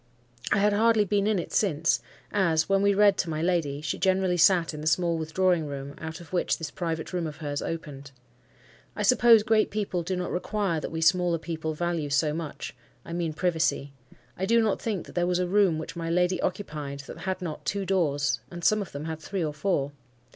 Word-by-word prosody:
I - - +4
had 205 +1 +3
hardly 220 0 +4
been 200 +1 +1
in 215 -2 +2
it 175 - -4
since; 165 -6 +1 0.3
as, 170 -6 +2
when 195 0 +2
we 200 0 +3
read 205 -1 +5
to 170 - 0
my 155 -1 -2
lady, 160 -5 0
she 150 -2 -3
generally 190 -1 +2
sat 175 -1 +4
in 150 - -6
the 155 - -3
small 170 +2 +2
withdrawing 165 +1 +1
room 140 0 -6
out 160 +2 -6
of 170 +1 -14
which 180 - +1
this 160 -3 -5
private 165 -1 -4
room 175 -2 -1
of 150 -1 -8
hers 145 -2 -3
opened. 145 -4 -6 0.9
I - - -2
suppose 235 -3 +6
great 215 0 +3
people 200 -4 -2
do 185 +3 -2
not 180 -1 -3
require 185 -2 -1
what - - -5
we 160 0 -3
smaller 175 +1 +3
people 160 -1 -4
value 170 -2 -2
so 150 +1 +2
much,—I 150 -2 -8
mean 170 -2 -2
privacy. 155 -4 0 0.4
I 190 - -2
do 230 +2 +4
not 220 -3 +1
think 210 -7 -2
that - - -13
there 175 0 +1
was 180 0 +1
a 180 - +1
room 190 -3 +3
which 160 +2 -6
my 165 -1 -4
lady 180 +2 +1
occupied 150 -7 -4
that 140 - -10
had 190 -1 -3
not 165 -5 -5
two 200 -1 -2
doors, 145 -9 +1
and 175 -1 -8
some 215 +4 +3
of 195 - -7
them 145 +2 -5
had 160 -1 -4
three 185 +1 -3
or 150 - -3
four. 145 -3 -1
170 Hz, 215 wpm, -27 LUFS, 155-190 Hz, 0.9 s, suppose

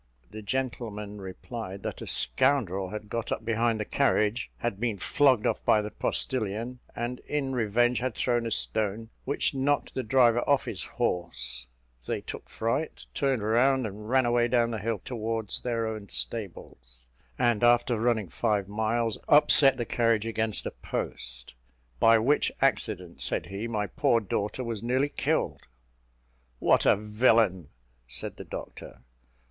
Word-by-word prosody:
The 110 - -8
gentleman 105 -3 -4
replied 95 +1 -7
that - - -5
a - - -7
scoundrel 95 - +2
having 105 +1 -7
got 115 +1 -4
up 115 - -3
behind 115 0 +1
the 105 - -2
carriage, 120 -4 +1
had 115 -4 -3
been 115 -3 -1
flogged 130 +3 +3
off - - 0
by 105 - +3
the 105 - -5
postilion; 120 0 -2 0.2
and, 120 +1 -3
in 140 -3 -3
revenge, 120 +1 +2
had 125 -1 -2
thrown 120 -2 0
a - - -2
stone, 110 0 -2
which 140 +2 0
knocked 140 +2 0
the 130 - -2
driver 120 -1 +4
off 140 -2 +3
his - - -4
horse: 65 -8 -2 0.4
they - - -1
took - - -9
fright, 130 +8 -2
turned 135 -6 0
round, 125 +4 +3
and 105 +1 -7
ran 130 0 +3
away 120 0 +2
down 120 -1 +2
the 110 - -3
hill 110 0 -2
towards 115 -3 -3
their 115 -2 -1
own 110 -2 -5
stables; 60 - -6 0.3
and 120 -3 +2
after 120 -1 +4
running 115 -4 +1
five 105 +2 -1
miles, 110 +2 -1
upset 145 -2 +8
the 120 - -2
carriage 115 -2 +1
against 110 -1 -1
a - - -3
post, - - -4 0.5
"by 115 0 +6
which 130 +7 +2
accident," 105 -10 -1
said - - +1
he, 100 +4 -5
"my 105 -3 -1
poor 120 +2 +2
daughter 105 +3 -3
was 115 -4 -4
nearly 130 +4 +1
killed." - - -1 1.0
"What - - +3
a - - +6
villain!" 105 - +2 0.4
said - - -5
the - - -8
doctor. - - -9
115 Hz, 155 wpm, -28 LUFS, 105-125 Hz, 1.0 s, upset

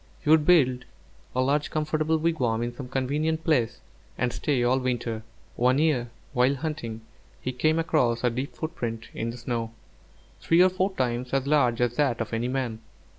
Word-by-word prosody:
He - - +2
would 155 -2 +5
build 130 -8 +4 0.5
a 130 - +2
large 145 +3 +1
comfortable 155 +1 0
wigwam 130 -9 0
in 120 0 -3
some 130 0 -7
convenient 150 +5 -1
place, 120 -8 +1 0.4
and 125 0 0
stay 135 -5 0
all 125 +2 +3
winter. 120 -3 -2 0.3
One 125 +2 +3
year, 145 -6 +1 0.2
while 130 +2 +3
hunting, 130 -7 -4 0.4
he 130 - -3
came 155 +6 +1
across 140 -8 +1
a 125 - +3
deep 130 +5 -4
footprint 115 -8 -4
in 115 - -3
the 115 - -6
snow, 115 -2 -3 0.7
three 170 +2 +4
or 185 - +5
four 185 +2 0
times 125 -3 -2
as 135 -1 +1
large 125 -5 +2
as 120 -1 0
that 135 -6 +2
of 115 -1 -4
any 115 +2 0
man. 125 -4 -2
130 Hz, 180 wpm, -26 LUFS, 120-155 Hz, 0.7 s, would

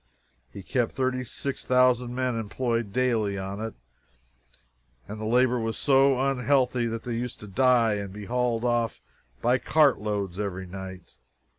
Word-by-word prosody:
He 100 - -9
kept 120 +2 -1
36,000 125 -1 0
men 130 -1 0
employed 115 0 -2
daily 110 -4 +1
on 95 +2 -5
it, 110 0 -5 1.3
and 105 +1 -7
the - - -3
labor 125 +1 +3
was 115 0 -2
so 135 -1 +4
unhealthy 130 -2 +1
that 115 0 -4
they 120 - -4
used 120 +1 -4
to 105 - -9
die 115 +2 +3
and 100 -1 -5
be 105 +1 -8
hauled 120 -1 0
off 120 -2 0 0.4
by 125 +2 +3
cartloads 105 - +1
every 95 -2 -3
night. 95 0 -9
120 Hz, 140 wpm, -26 LUFS, 105-125 Hz, 1.3 s, so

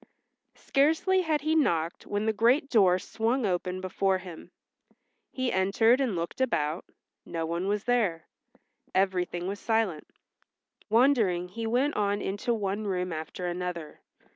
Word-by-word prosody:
Scarcely 320 +7 +2
had 315 -4 0
he 310 +2 0
knocked 170 - 0
when 205 +1 -1
the 220 - +1
great 250 +7 +2
door 190 -6 +5
swung 225 +5 -1
open 180 -1 -2
before 190 +1 0
him. 175 -3 -10 0.8
He 260 -1 -2
entered 225 +7 +3
and 245 -8 0
looked 170 +9 -4
about, 160 -10 0 0.4
no 165 -1 -4
one 170 +3 -2
was 205 0 0
there; 215 -10 0 0.7
everything 180 -2 0
was 200 +1 -4
silent. 220 -9 0 0.8
Wondering 220 -7 +3
he 225 +4 -4
went 260 +6 +1
on 205 -1 0
into 205 +5 -2
one 210 -1 -2
room 180 -2 -2
after 160 +3 -6
another. 175 -3 -5
200 Hz, 140 wpm, -28 LUFS, 180-240 Hz, 0.8 s, door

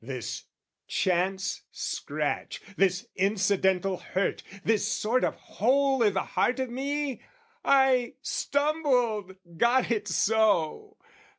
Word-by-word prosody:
This 125 -1 -5 0.4
chance 190 +2 0
scratch, - - -3 0.2
This 185 -1 +1
incidental 195 -1 +1
hurt, 195 +3 -2 0.2
this 220 -2 +1
sort 240 +4 +1
of - - 0
hole 270 +3 +1
I' 220 - +5
the 190 -1 -1
heart 250 +2 0
of 260 -2 -2
me? 280 +1 -2 0.4
I 265 -3 +3
stumbled, 255 - 0 0.2
got 240 +1 +3
it 210 -2 -1
so! 205 -3 +1
220 Hz, 105 wpm, -27 LUFS, 190-260 Hz, 0.4 s, I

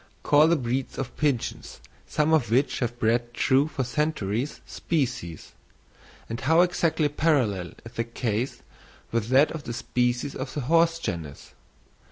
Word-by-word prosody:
Call 150 +2 +5
the 170 - +4
breeds 130 -1 -2
of 135 - -4
pigeons, 140 -6 -2 0.3
some 155 +1 +1
of 130 -8 +3
which 130 +5 +2
have 120 -1 -2
bred 120 +1 0
true 135 +2 +3
for 140 -3 -3
centuries, 125 -2 -2
species; 120 - -3 0.8
and 115 +2 -5
how 160 +5 +4
exactly 170 -3 +2
parallel 130 - 0
is 115 - -9
the 115 - -2
case 115 +1 -3 0.5
with 115 -2 0
that 135 +5 +4
of 160 -3 -7
the 120 - -4
species 125 +3 -1
of 130 0 -5
the 145 - -1
horse 165 +4 +3
genus! 80 - -6
130 Hz, 150 wpm, -26 LUFS, 115-150 Hz, 0.8 s, Call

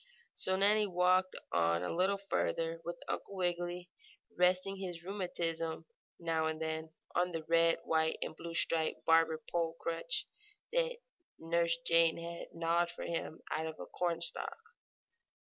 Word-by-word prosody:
So 190 - +1
Nannie 210 +2 +4
walked 185 0 +3 0.2
on 85 0 +2
a 90 - -2
little 190 +3 +2
farther, 165 -4 -1
with 170 +1 -6
Uncle 200 - -4
Wiggily 175 -1 -2 0.4
resting 185 +2 +3
his 175 -3 -5
rheumatism, 165 -4 -2 0.3
now 165 -2 0
and 160 0 -2
then, 160 0 -3 0.2
on 180 0 +1
the 165 -1 -3
red, 165 +1 +4
white 160 0 +2
and - - -6
blue 165 +1 -7
striped 160 -1 +1
barber 165 -1 +4
pole 165 -1 0
crutch 170 - -1 0.5
that - - +1 0.4
Nurse 170 0 +1
Jane 165 -1 +5
had 170 0 -6
gnawed 170 +1 +1
for - - -7
him 165 -1 -4
out 160 - -1
of 160 - -7
a - - -5
cornstalk. 170 -1 0
170 Hz, 145 wpm, -34 LUFS, 165-180 Hz, 0.5 s, Jane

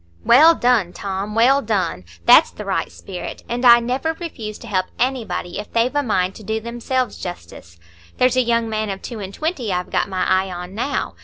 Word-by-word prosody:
"Well 315 +7 +7
done, 235 - +2
Tom, 195 +2 -4
well 260 +5 +4
done! 200 - -2 0.2
That's - - +7
the - - -9
right - - -2
spirit, 180 - -8
and 240 +1 -3
I 240 -1 +8
never 255 +7 -1
refuse 235 - -7
to - - -12
help 185 -2 0
anybody 245 -8 -2
if 210 - -8
they've 235 +4 +1
a 290 - +3
mind 190 -7 0
to 220 - -12
do 220 +2 -2
themselves 240 +1 -3
justice. 85 - -9 0.4
There's 255 0 +3
a 255 - +4
young 235 -1 +1
man 215 -1 -2
of 195 -1 -5
two 235 -3 -6
and 195 -2 -6
twenty 290 - -3
I've 180 0 -3
got - - 0
my 185 -1 -1
eye 190 0 +1
on 180 +1 -7
now. 240 +7 -2
220 Hz, 205 wpm, -20 LUFS, 190-250 Hz, 0.4 s, I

